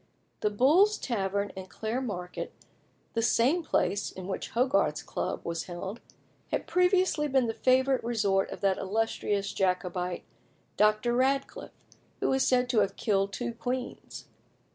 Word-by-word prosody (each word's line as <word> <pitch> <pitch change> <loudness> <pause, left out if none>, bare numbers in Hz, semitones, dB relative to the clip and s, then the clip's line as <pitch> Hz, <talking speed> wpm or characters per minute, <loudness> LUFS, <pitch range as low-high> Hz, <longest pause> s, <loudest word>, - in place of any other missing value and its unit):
The 210 - +1
Bull's 310 - +4
Head 245 - -3
Tavern 200 0 -1
in 190 0 -7
Clare 220 +6 -3
Market, 180 -8 -5 0.6
the 230 - 0
same 250 +9 +3
place 205 -9 0
in 185 - -8
which 195 - -4
Hogarth's 260 +5 +1
club - - -3
was 170 0 -3
held, 190 +5 -6 0.5
had - - -1
previously 360 -4 +2
been 265 -3 +2
the 225 - -1
favourite 260 +2 +2
resort 205 -5 +1
of - - -8
that 195 -2 +2
illustrious 205 -1 -1
Jacobite, 180 -1 -1 0.5
Dr. 215 +3 +3
Radcliffe, 270 +2 -1 0.3
who - - +1
is 265 - +2
said 250 -1 +3
to 240 -3 +3
have 200 -1 +1
killed 195 -2 +1
two 240 +3 -3
queens. 245 +2 -5
225 Hz, 145 wpm, -29 LUFS, 195-260 Hz, 0.6 s, Bull's